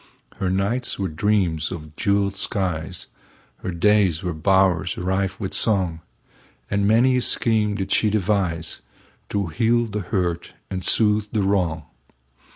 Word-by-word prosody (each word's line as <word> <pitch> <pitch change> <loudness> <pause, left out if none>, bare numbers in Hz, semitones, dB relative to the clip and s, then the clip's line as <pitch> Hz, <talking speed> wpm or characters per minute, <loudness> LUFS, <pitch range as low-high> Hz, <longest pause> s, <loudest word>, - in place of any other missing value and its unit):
Her 95 -2 -1
nights 100 +7 -1
were 95 - -1
dreams 85 -2 0
of 80 -4 -8
jeweled 100 0 +1
skies, 90 -5 -2 0.5
Her - - -6
days 95 -1 +2
were 90 - -2
bowers 90 0 +2
rife 95 +1 -1
with 95 -3 -4
song, 95 -7 0 0.7
And 100 0 +2
many 125 +4 +4
a - - +1
scheme 110 -4 +2
did 95 -2 -4
she 110 - +3
deviseTo 95 -1 -3
heal 120 +5 +2
the 105 -2 -4
hurt 90 -3 -2 0.2
and 95 -1 -3
soothe 105 +1 +2
the 105 -3 +1
wrong. 90 -5 0
95 Hz, 135 wpm, -22 LUFS, 90-105 Hz, 0.7 s, many